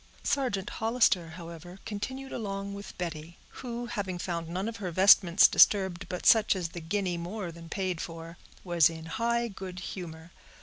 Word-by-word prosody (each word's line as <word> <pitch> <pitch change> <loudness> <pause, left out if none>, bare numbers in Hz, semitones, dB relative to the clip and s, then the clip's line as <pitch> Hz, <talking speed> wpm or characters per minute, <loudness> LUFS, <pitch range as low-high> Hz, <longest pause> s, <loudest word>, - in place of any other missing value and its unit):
Sergeant 225 -9 0
Hollister, 220 -7 +2
however, 170 +1 -10
continued 260 +5 -5
along 200 -3 -4
with 200 -1 -9
Betty, 170 -1 -6
who, 240 -1 -6
having 200 -6 -3
found 170 -2 -4
none 185 +4 -2
of 230 0 -5
her 195 -4 -4
vestments 185 0 +6
disturbed 190 -2 +4
but 180 - -5
such 220 -2 +6
as 175 -3 -3
the 170 - -8
guinea 180 +1 -1
more 180 +1 -5
than 165 0 -12
paid 185 -2 -2
for, 165 +1 -8 0.2
was 175 -4 +4
in 160 -1 -8
high 235 +7 0
good 190 -3 -8
humor. 170 -2 -7
185 Hz, 165 wpm, -29 LUFS, 170-205 Hz, 0.2 s, vestments